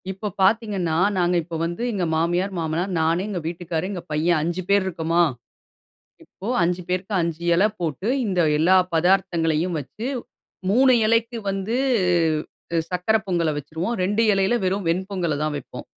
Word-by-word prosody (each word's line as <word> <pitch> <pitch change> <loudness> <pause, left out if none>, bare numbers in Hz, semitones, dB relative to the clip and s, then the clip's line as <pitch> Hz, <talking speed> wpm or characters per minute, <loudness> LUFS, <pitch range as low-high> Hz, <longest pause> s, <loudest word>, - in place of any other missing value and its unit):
இப்ப 195 +2 -4
பார்த்தீங்கன்னா, 195 -5 +1 0.2
நாங்க 175 0 +2
இப்ப 165 +1 -7
வந்து 175 +5 -4
எங்க 190 -4 -1
மாமியார், 175 +4 0
மாமனார் 165 +4 -2
நானு, 165 +3 +1
எங்க 190 -4 -3
வீட்டுக்காரு, 170 -1 -3
எங்க 185 -3 -5
பையன் 155 +2 +2
5 175 +3 -2
பேர் 200 -1 +4
இருக்கோமா? 170 -1 +1 1.0
இப்ப 200 +5 -7
5 180 +1 0
பேருக்கு 185 +3 -2
5 165 -1 -3
இலை 195 +5 +4
போட்டு, 170 - -2 0.2
இந்த, 185 -3 0 0.2
எல்லா 175 +5 +5 0.2
பதார்த்தங்களையும் 170 -1 +1
வெச்ச 140 - -13 0.7
3 255 +5 +5
இலைக்கு 230 +1 +1
வந்து 195 +3 -2 1.2
சர்க்கரை 180 +5 +1
பொங்கல 170 -4 +1
வைச்சுருவோம். 160 - -3
2 205 +4 +1
இலைல 195 +4 +2
வெறும் 190 0 -1
வெண்பொங்கல 180 -2 -1
தான் 155 0 0
வெப்போம். 140 - -8
180 Hz, 145 wpm, -23 LUFS, 165-195 Hz, 1.2 s, எல்லா